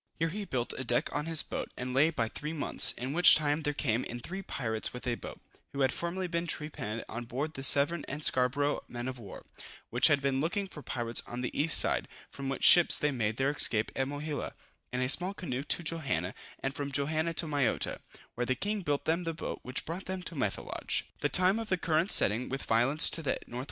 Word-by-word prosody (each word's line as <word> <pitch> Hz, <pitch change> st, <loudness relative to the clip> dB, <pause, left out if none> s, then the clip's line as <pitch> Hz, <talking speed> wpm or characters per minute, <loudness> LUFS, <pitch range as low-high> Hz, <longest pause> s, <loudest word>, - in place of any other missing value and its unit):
_] -, -, -63 dB
Here 165 Hz, 0 st, 0 dB
he 205 Hz, +4 st, -5 dB
built 125 Hz, -8 st, -2 dB
a -, -, -3 dB
deck 120 Hz, -1 st, 0 dB
on 150 Hz, -, -2 dB
his 165 Hz, -2 st, +5 dB
boat, -, -, -5 dB
and 125 Hz, 0 st, -4 dB
lay 145 Hz, +5 st, +4 dB
by 115 Hz, -9 st, -1 dB
three 150 Hz, +7 st, -6 dB
months, 155 Hz, -, +5 dB
in 130 Hz, +3 st, -5 dB
which 175 Hz, +3 st, +8 dB
time 150 Hz, 0 st, 0 dB
there 145 Hz, -1 st, -1 dB
came 125 Hz, -5 st, -1 dB
in 120 Hz, -, -6 dB
three 190 Hz, +10 st, -6 dB
pirates 110 Hz, -, -2 dB
with 125 Hz, -, -8 dB
a 125 Hz, -, 0 dB
boat, -, -, -8 dB, 0.3 s
who 140 Hz, -, -3 dB
had 130 Hz, -1 st, +2 dB
formerly 175 Hz, +2 st, -3 dB
been 170 Hz, -1 st, -3 dB
trepanned 115 Hz, -9 st, -3 dB
on 120 Hz, +2 st, -6 dB
board 140 Hz, +7 st, -4 dB
the 135 Hz, -, -7 dB
Severn 145 Hz, +4 st, +5 dB
and 145 Hz, +2 st, -4 dB
Scarborough 135 Hz, +3 st, +2 dB
men 120 Hz, +1 st, -6 dB
of 130 Hz, -1 st, -6 dB
war, 100 Hz, -4 st, -10 dB, 0.5 s
which 120 Hz, +2 st, +5 dB
had 145 Hz, -3 st, +3 dB
been 135 Hz, -1 st, 0 dB
looking 180 Hz, +6 st, -1 dB
for 175 Hz, -6 st, -10 dB
pirates 120 Hz, -3 st, -1 dB
on 120 Hz, +1 st, -5 dB
the 125 Hz, -, -4 dB
east 155 Hz, +2 st, +4 dB
side; -, -, +2 dB, 0.2 s
from 135 Hz, -1 st, -6 dB
which 135 Hz, -, -4 dB
ships 175 Hz, -1 st, +7 dB
they 150 Hz, -, 0 dB
made 110 Hz, -4 st, -2 dB
their 135 Hz, +1 st, +1 dB
escape 110 Hz, -7 st, 0 dB
at 135 Hz, -, -1 dB
Mohila, 145 Hz, +1 st, -5 dB, 0.4 s
in 125 Hz, 0 st, -2 dB
a 130 Hz, -, +1 dB
small 180 Hz, +8 st, +3 dB
canoe 135 Hz, -9 st, -4 dB
to 175 Hz, -, +1 dB
Johanna, 140 Hz, -, -1 dB, 0.3 s
and 135 Hz, -, -2 dB
from 140 Hz, 0 st, -5 dB
Johanna 155 Hz, +4 st, -1 dB
to 165 Hz, -, +1 dB
Mayotta, 145 Hz, -6 st, 0 dB, 0.3 s
where 125 Hz, 0 st, -3 dB
the 130 Hz, -, +1 dB
king 205 Hz, +8 st, -2 dB
built 145 Hz, -5 st, -2 dB
them 165 Hz, +3 st, 0 dB
the 165 Hz, -1 st, -4 dB
boat -, -, -5 dB
which 125 Hz, +1 st, -4 dB
brought 170 Hz, +4 st, -6 dB
them 190 Hz, -1 st, -5 dB
to 180 Hz, -, -7 dB
Methelage. 105 Hz, -10 st, -2 dB, 0.2 s
The -, -, 0 dB
time 185 Hz, +4 st, +2 dB
of 225 Hz, -1 st, -6 dB
the 185 Hz, -, +1 dB
current's 170 Hz, +2 st, +3 dB
setting 115 Hz, +5 st, +4 dB
with 135 Hz, +1 st, -4 dB
violence 125 Hz, +7 st, +3 dB
to 165 Hz, -, 0 dB
the 140 Hz, -, -1 dB
N.W. 120 Hz, -, -7 dB
145 Hz, 235 wpm, -30 LUFS, 125-165 Hz, 0.5 s, which